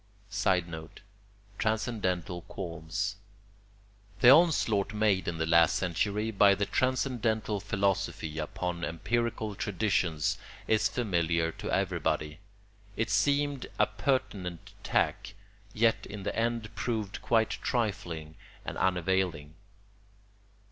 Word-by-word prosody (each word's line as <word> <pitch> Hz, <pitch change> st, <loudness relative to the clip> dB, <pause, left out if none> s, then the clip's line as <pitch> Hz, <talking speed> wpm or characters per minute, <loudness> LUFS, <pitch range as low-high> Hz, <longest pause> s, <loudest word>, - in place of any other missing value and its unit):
[Sidenote: 85 Hz, -5 st, -1 dB, 0.6 s
Transcendental 100 Hz, -6 st, -1 dB
qualms.] 95 Hz, +1 st, -4 dB, 1.0 s
The 120 Hz, -, +9 dB
onslaught 130 Hz, -, +4 dB
made 105 Hz, -3 st, +2 dB
in 85 Hz, -1 st, -2 dB
the 80 Hz, -, 0 dB
last 85 Hz, 0 st, +5 dB
century 105 Hz, +5 st, 0 dB
by 100 Hz, -1 st, +5 dB
the 100 Hz, -, 0 dB
transcendental 120 Hz, -4 st, 0 dB
philosophy 100 Hz, -5 st, -1 dB
upon 85 Hz, +3 st, -3 dB
empirical 110 Hz, +6 st, -1 dB
traditions 95 Hz, -6 st, 0 dB, 0.3 s
is 110 Hz, 0 st, +3 dB
familiar 85 Hz, -7 st, 0 dB
to -, -, -7 dB
everybody: 75 Hz, +1 st, -1 dB, 0.6 s
it 110 Hz, -1 st, 0 dB
seemed 145 Hz, +5 st, +1 dB
a 105 Hz, -, +5 dB
pertinent 105 Hz, -6 st, -2 dB
attack, 95 Hz, +2 st, 0 dB, 0.4 s
yet 115 Hz, +2 st, +2 dB
in 105 Hz, -1 st, -7 dB
the -, -, -3 dB
end 115 Hz, -1 st, -1 dB
proved 110 Hz, -4 st, -3 dB
quite 115 Hz, -2 st, +2 dB
trifling 85 Hz, -, -2 dB, 0.3 s
and -, -, -5 dB
unavailing. 90 Hz, -4 st, 0 dB
100 Hz, 100 wpm, -30 LUFS, 85-110 Hz, 1.0 s, The